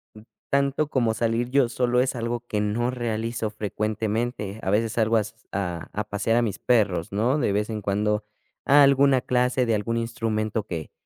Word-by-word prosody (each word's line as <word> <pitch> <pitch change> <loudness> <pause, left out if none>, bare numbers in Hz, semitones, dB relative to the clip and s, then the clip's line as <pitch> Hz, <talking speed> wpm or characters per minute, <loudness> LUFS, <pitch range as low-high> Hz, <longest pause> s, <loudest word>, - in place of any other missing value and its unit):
mm, 105 - -12 0.3
tanto 140 +2 +1
como 120 -6 +1
salir 115 +2 0
yo 135 -2 +3
solo 125 0 +1
es 130 +1 -1
algo 120 0 -2
que 105 -2 -1
no 115 +4 0
realizo 115 -2 -2
frecuentemente. 105 0 -3
A - - -1
veces 110 +2 +1
salgo 115 0 +2
as 110 +1 -2 0.2
a 90 -4 -3
a 105 - -2
pasear 105 +3 0
a - - +4
mis 110 -5 -2
perros, 100 -9 +1
¿no?, 115 +8 +1
de 130 -8 +1
vez 105 +2 0
en 110 -2 -3
cuando 105 +2 0 0.4
a 145 +1 +7
alguna 140 -1 +4
clase 125 +1 +1
de 115 -2 +2
algún 115 +3 -1
instrumento 110 -2 -2
que 80 -6 -6
115 Hz, 185 wpm, -25 LUFS, 105-125 Hz, 0.4 s, a